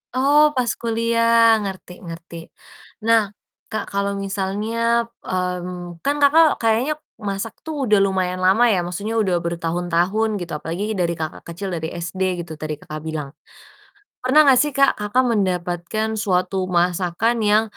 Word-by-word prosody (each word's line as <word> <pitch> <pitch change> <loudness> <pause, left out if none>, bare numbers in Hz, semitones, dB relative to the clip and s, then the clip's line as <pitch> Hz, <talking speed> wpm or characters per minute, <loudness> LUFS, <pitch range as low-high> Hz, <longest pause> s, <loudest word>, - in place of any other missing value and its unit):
Oh 285 +3 +4 0.2
pas 250 - +2 0.2
kuliah, 230 -1 +3
ngerti 190 -2 -7
ngerti. 170 -1 -9 0.7
Nah, 230 0 +5 0.5
Kak, 215 -1 -3
kalau 200 0 0
misalnya 215 +4 -1 0.2
mmm, 180 -1 -4
kan 285 - +2
Kakak 310 +2 +5
kayaknya 230 +7 +2 0.4
masak 195 +3 -4
tuh 300 -4 -3
udah 210 -3 +4
lumayan 185 -1 -1
lama 210 +6 +5
ya, 180 - +1
maksudnya 200 +5 -4
udah 190 -4 +1
bertahun-tahun 175 +5 0
gitu, 175 - -6
apalagi 200 +8 -4
dari 170 -2 0
Kakak 160 -1 -6
kecil 195 +3 -5
dari 160 -1 -3
SD 175 +2 -6 0.2
gitu 165 -1 -8
tadi 155 0 -4
Kakak 155 0 -7
bilang, 155 -3 -4 0.9
pernah 290 +5 +5
enggak 265 -3 +6
sih 295 - +1
Kak, 275 0 +5
Kakak 225 +5 +2
mendapatkan 185 +2 -1
suatu 185 -1 0
masakan 180 +5 +1
yang, 210 +1 +4
195 Hz, 140 wpm, -21 LUFS, 175-230 Hz, 0.9 s, enggak